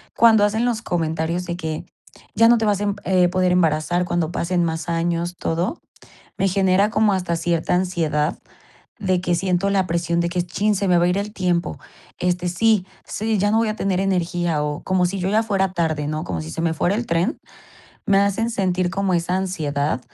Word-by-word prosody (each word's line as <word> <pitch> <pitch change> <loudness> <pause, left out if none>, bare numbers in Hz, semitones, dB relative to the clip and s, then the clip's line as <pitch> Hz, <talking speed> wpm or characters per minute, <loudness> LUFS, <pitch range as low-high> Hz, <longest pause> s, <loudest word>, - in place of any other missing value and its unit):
cuando 220 -2 +5
hacen 220 +3 0
los 240 -2 0
comentarios 165 0 -1
de 175 0 -4
que: 160 -3 -4 0.5
"Ya 230 - +6
no 240 +1 +6
te 220 - 0
vas, 205 -2 +1
em, 205 -1 -1
eh, 180 -1 +3
poder 185 0 +1
embarazar 175 0 +1
cuando 175 -2 -1
pasen 175 0 0
más 160 0 -2
años", 170 +1 -1
todo, 175 - -2 0.6
me 195 - +2
genera 190 +1 +3
como 215 -1 +2
hasta 180 -3 -1
cierta 170 0 0
ansiedad 165 -4 0 0.6
de 185 -4 0
que 175 -1 0
siento 180 +2 0
la 195 -2 +1
presión 170 0 0
de 170 - 0
que 175 0 -1
chin, 205 +4 0
se 200 +1 -1
me 180 -2 +4
va 170 - +3
a - - +2
ir 180 +2 +1
el 205 +1 -4
tiempo. 175 - -1 0.4
Este, 180 0 0
sí, 205 +2 +2 0.2
sí, 220 +1 -2
ya 205 +2 +2
no 220 - +3
voy 225 -1 +1
a 215 - -1
tener 195 -3 0
energía, 175 -4 0
o, 150 0 -3
como 185 -1 +1
si 195 +2 -3
yo 185 0 -1
ya 215 +3 +2
fuera 195 -4 0
tarde, 160 -4 -1
¿no?, 155 +1 -3
como 85 -3 -3
si 80 0 -7
se - - -4
me 165 -1 +1
fuera 175 +4 0
el 235 +3 -1
tren. 175 - 0 0.7
Me 195 -1 +4
hacen 200 +3 +1
sentir 185 -4 0
como 190 +1 -1
esa 170 +1 0
ansiedad 150 -8 -1
180 Hz, 210 wpm, -21 LUFS, 170-195 Hz, 0.7 s, Ya